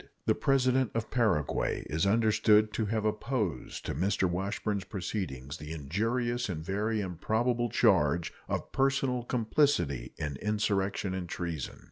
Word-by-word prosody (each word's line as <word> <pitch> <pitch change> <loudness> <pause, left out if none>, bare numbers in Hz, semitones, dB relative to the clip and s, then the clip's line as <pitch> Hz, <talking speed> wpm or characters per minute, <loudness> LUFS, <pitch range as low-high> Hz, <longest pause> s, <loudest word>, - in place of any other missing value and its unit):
The - - +4
President 130 -2 +2
of 115 -1 -2
Paraguay 105 - +1
is 80 +5 0
understood 110 0 +4
to 110 - -1
have 110 0 -1
opposed 105 - -2
to - - -2
Mr. 95 +5 +1
Washburn's 100 +3 -2
proceedings 85 - -4
the 75 +1 -8
injurious 115 - -1
and 80 -3 -4
very 105 +4 0
improbable 115 +7 0
charge 85 - +3 0.2
of - - -3
personal 135 -2 +1
complicity 110 - +1
in 75 -4 -3
insurrection 100 -1 0
and 90 -2 -4
treason. 85 -6 -4
105 Hz, 130 wpm, -30 LUFS, 85-115 Hz, 0.2 s, The